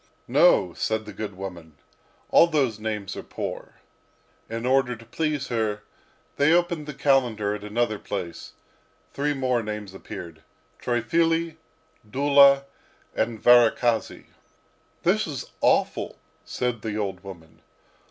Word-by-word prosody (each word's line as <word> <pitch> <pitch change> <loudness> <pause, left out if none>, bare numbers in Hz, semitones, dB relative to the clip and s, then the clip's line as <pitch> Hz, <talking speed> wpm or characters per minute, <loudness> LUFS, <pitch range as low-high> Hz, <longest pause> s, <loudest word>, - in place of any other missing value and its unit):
"No," - - +4
said 110 0 -2
the 105 - -9
good 100 0 -6
woman, 85 -6 -8 0.5
"all 170 - +7
those 135 -10 0
names 105 -3 -4
are - - -5
poor." - - -6 0.7
In 115 +1 -4
order 130 -1 +2
to 115 0 -15
please 150 +2 -2
her, 110 -3 -1 0.5
they 145 +2 +4
opened 170 -3 +1
the 150 - -6
calendar 125 -7 +1
at 105 -1 -6
another 110 0 -1
place; 85 -4 -6 0.6
three 145 +1 -1
more 130 -3 0
names 105 -3 -6
appeared, 85 -4 -9 0.4
Triphily, 165 +7 0 0.5
Dula, 140 +2 +5 0.5
and 110 0 -1
Varakhasy. 120 -1 +3 0.8
"This - - +2
is - - -6
awful," - - +1 0.3
said 125 -3 -2
the 105 -1 -4
old 95 -3 -3
woman. 85 -5 -12
115 Hz, 125 wpm, -25 LUFS, 105-140 Hz, 0.8 s, all